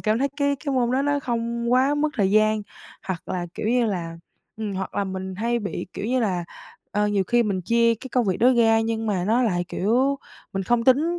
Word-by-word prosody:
cảm 215 +1 +1
thấy 275 +1 +1
cái 285 -1 +1
cái 280 -2 -1
môn 245 -2 +2
đó 270 +2 +2
nó 285 0 +1
không 235 -1 -2
quá 265 +3 +4
mất 300 +1 +1
thời 195 -5 +1
gian. 215 0 +3 0.4
Hoặc 185 -4 -4
là 175 -1 -2
kiểu 215 - -4
như 240 -1 +3
là 170 -5 -3 0.4
ừm, 215 -2 -4
hoặc 190 0 -4
là 200 - 0
mình 190 0 -5
hay 235 +4 0
bị, 205 -4 -4
kiểu - - -5
như 255 +1 +1
là, 180 -6 0 0.5
ờ, 210 0 +1
nhiều 200 -2 +1
khi 240 +4 +3
mình 195 -4 -1
chia 230 +3 +3
cái 260 +4 -10
công 250 -1 +1
việc 185 - +1
đó 255 +2 +5
ra, 225 -1 +4
nhưng 225 0 -2
mà 185 -4 0
nó 230 +5 +2
lại, 175 -6 0
kiểu, 260 +7 +1 0.3
mình 195 0 -2
không 235 +3 +1
tính 315 +7 +3
225 Hz, 235 wpm, -24 LUFS, 200-250 Hz, 0.5 s, đó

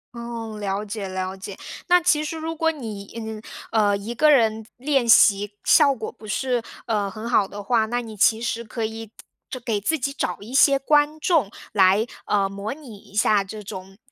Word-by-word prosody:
哦， 230 -2 -6
了 200 0 -2
解 200 -2 -5
了 185 0 -4
解， 195 0 -8 0.3
那 355 0 +6
其 305 -2 +2
实 320 +1 -4
如 325 +1 -4
果 325 0 +1
你， 215 -9 -8
嗯， 220 -1 -6 0.3
呃， 205 -2 +3
一 220 +4 -6
个 305 +4 +5
人 220 -4 +3
练 270 -2 +1
习 205 -1 +6
效 285 -3 +6
果 225 -4 -6
不 220 - -15
是， 245 +2 -1 0.2
呃， 205 -4 -1
很 220 +4 -6
好 205 -5 +3
的 205 +1 -8
话， 220 +1 +2
那 240 +2 -1
你 220 -2 -9
其 220 +3 +3
实 235 0 -2
可 225 0 -4
以 225 0 -7 0.4
就 255 - -5
给 225 -5 -2
自 320 +7 0
己 275 +3 -2
找 180 -9 -2
一 220 +6 -10
些 275 0 +5
观 295 +2 +2
众， 305 - +2 0.2
来， 195 +2 +4 0.2
呃， 200 -2 +2
模 200 +4 -5
拟 275 -8 -12
一 200 - -18
下 210 -1 +3
这 210 +2 -8
种 190 -1 -9
220 Hz, 215 characters per minute, -23 LUFS, 205-265 Hz, 0.4 s, 那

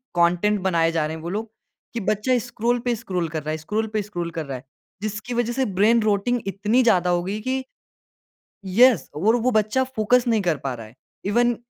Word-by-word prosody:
Content 180 +5 +3
बनाए 165 -3 +2
जा 160 -2 0
रहे 160 +1 -4
हैं 160 - -9
वो 170 - -4
लोग 215 +3 -4 0.4
कि 235 - -2
बच्चा 215 +5 +2
स्क्रॉल 240 +1 0
पे 240 -1 +1
स्क्रॉल 185 -6 -3
कर 155 -2 -4
रहा 155 - -3
है 155 - -2
स्क्रॉल 210 +8 -2
पे 215 - +1
स्क्रॉल 175 -5 -4
कर 165 -2 -4
रहा 135 -2 -5
है। 125 - -13 0.4
जिसकी 215 +3 -4
वजह 240 0 0
से 265 +1 0
ब्रेन 215 +4 +3
रोटिंग 215 +3 +1
इतनी 210 +5 +1
ज़्यादा 185 -6 +3
हो 175 0 +1
गई 200 +3 -3
कि 260 +2 -2 1.0
येस 225 +3 +4
और 210 +10 +3
वो 245 +1 +1
बच्चा 215 +3 +2
फोकस 240 +3 +3
नहीं 225 -3 +2
कर 170 -5 +1
पा 135 -2 -2
रहा 115 -2 -8
है। 110 - -18 0.3
इवन 240 +3 +2
210 Hz, 215 wpm, -23 LUFS, 175-235 Hz, 1.0 s, येस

